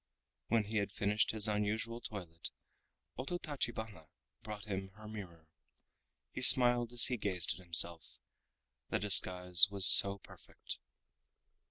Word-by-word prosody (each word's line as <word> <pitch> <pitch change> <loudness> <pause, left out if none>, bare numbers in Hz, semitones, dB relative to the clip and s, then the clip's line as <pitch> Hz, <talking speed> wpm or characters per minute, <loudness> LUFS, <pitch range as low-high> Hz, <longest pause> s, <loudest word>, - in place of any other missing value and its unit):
When 115 -1 -2
he 110 +2 -8
had 100 -1 -5
finished 105 +1 -4
his 110 -1 0
unusual 110 +3 -6
toilet, 90 -7 -9 0.7
Ototachibana 120 - -9 0.3
brought 105 -1 -12
him 95 -2 -9
her 110 0 -16
mirror. 90 -7 -14 0.9
He - - -10
smiled 120 -2 +3
as 120 -2 +3
he 125 - -3
gazed 95 -6 -5
at 95 - -17
himself—the 80 -7 -3
disguise 90 -2 +3
was 100 -2 +1
so 100 0 +8
perfect. 95 - -14
105 Hz, 120 wpm, -30 LUFS, 90-110 Hz, 0.9 s, so